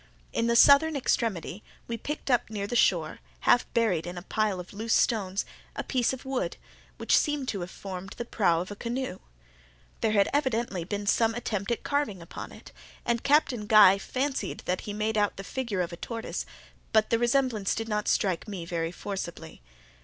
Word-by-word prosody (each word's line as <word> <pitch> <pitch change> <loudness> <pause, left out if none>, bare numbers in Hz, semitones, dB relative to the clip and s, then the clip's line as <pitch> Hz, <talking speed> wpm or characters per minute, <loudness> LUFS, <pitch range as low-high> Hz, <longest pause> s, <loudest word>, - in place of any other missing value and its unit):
In 230 0 +1
the 235 - +2
southern 290 +5 +7
extremity, 215 - -1 0.2
we 235 - -2
picked 285 +4 -4
up 245 - +2
near 205 -2 -3
the 240 - -4
shore, 170 -9 +2 0.2
half 245 - +3
buried 200 -9 +2
in 175 0 -6
a 175 - -6
pile 210 -2 0
of 180 +2 -9
loose 225 +3 0
stones, 200 -4 +1 0.3
a - - -3
piece 250 -3 +1
of 265 0 -7
wood, 260 -10 -2 0.4
which - - +2
seemed 295 -3 +1
to 200 - -2
have 175 0 -5
formed 190 0 -7
the 240 - -4
prow 170 -8 +2
of 185 - -6
a - - -5
canoe. 240 -2 -4 0.8
There 220 -1 +1
had 200 -2 +5
been - - -3
evidently 235 - 0 0.2
some 225 +2 +2
attempt 210 -4 -3
at 235 - -1
carving 285 -10 -1
upon 170 - -8
it, - - -13 0.3
and 235 -1 +1
Captain 265 -7 +2
Guy 205 -3 +8
fancied 270 +6 -2
that 180 +1 -1
he - - -1
made 215 +1 0
out 205 -1 +1
the 195 - -6
figure 230 -5 -2
of 175 0 -3
a - - -7
tortoise, 230 +3 -5 0.4
but 220 -1 +3
the 230 - +3
resemblance 240 -4 +1
did 225 0 -3
not 210 -1 -1
strike 190 0 +1
me 190 -5 -5
very 165 -1 -2
forcibly. 175 - -6
215 Hz, 190 wpm, -28 LUFS, 190-240 Hz, 0.8 s, Guy